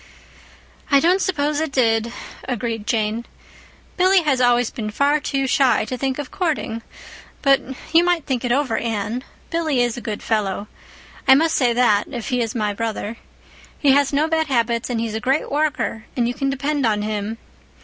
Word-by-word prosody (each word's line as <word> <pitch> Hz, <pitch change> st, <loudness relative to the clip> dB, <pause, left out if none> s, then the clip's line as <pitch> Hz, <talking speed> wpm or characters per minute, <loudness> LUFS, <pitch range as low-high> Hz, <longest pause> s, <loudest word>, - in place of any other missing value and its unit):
"I 280 Hz, -2 st, +6 dB
don't 360 Hz, +6 st, +3 dB
suppose 300 Hz, -5 st, 0 dB
it 315 Hz, -2 st, -2 dB
did," 230 Hz, -3 st, +2 dB, 0.3 s
agreed 230 Hz, -3 st, -3 dB
Jane. 220 Hz, 0 st, 0 dB, 0.7 s
"Billy 370 Hz, 0 st, +4 dB
has 270 Hz, -4 st, +1 dB
always 245 Hz, -1 st, +3 dB
been 220 Hz, -4 st, -4 dB
far 285 Hz, +7 st, +2 dB
too 275 Hz, -2 st, -1 dB
shy 255 Hz, -4 st, +3 dB
to 255 Hz, -, -4 dB
think 265 Hz, +1 st, -2 dB
of 290 Hz, -3 st, -6 dB
courting. 305 Hz, -10 st, -2 dB, 0.6 s
But 275 Hz, -1 st, +5 dB, 0.3 s
you 335 Hz, +1 st, +6 dB
might 350 Hz, -3 st, +1 dB
think 260 Hz, -3 st, -2 dB
it 245 Hz, -, 0 dB
over, 255 Hz, -3 st, +1 dB
Anne. 225 Hz, +2 st, -2 dB, 0.3 s
Billy 320 Hz, -5 st, 0 dB
is 240 Hz, -1 st, -1 dB
a -, -, -5 dB
good 215 Hz, -3 st, -5 dB
fellow. 205 Hz, -2 st, -1 dB, 0.6 s
I 265 Hz, -, +9 dB
must 320 Hz, +3 st, +2 dB
say 250 Hz, -3 st, +3 dB
that, 230 Hz, -4 st, +3 dB
if 240 Hz, -1 st, -5 dB
he 250 Hz, -2 st, +1 dB
is 225 Hz, 0 st, -2 dB
my 210 Hz, -3 st, 0 dB
brother. 225 Hz, +1 st, -4 dB, 0.6 s
He 280 Hz, -, +4 dB
has 280 Hz, 0 st, +3 dB
no 295 Hz, +2 st, +2 dB
bad 320 Hz, -1 st, 0 dB
habits 235 Hz, -3 st, 0 dB
and 240 Hz, -2 st, -1 dB
he's 225 Hz, -1 st, -2 dB
a 220 Hz, -, -2 dB
great 265 Hz, +6 st, 0 dB
worker, 285 Hz, -7 st, -1 dB
and 240 Hz, -1 st, +2 dB
you 245 Hz, -, -1 dB
can 275 Hz, +1 st, -1 dB
depend 280 Hz, +1 st, -1 dB
on 210 Hz, -3 st, +1 dB
him. 210 Hz, +1 st, -3 dB
250 Hz, 185 wpm, -21 LUFS, 225-285 Hz, 0.7 s, I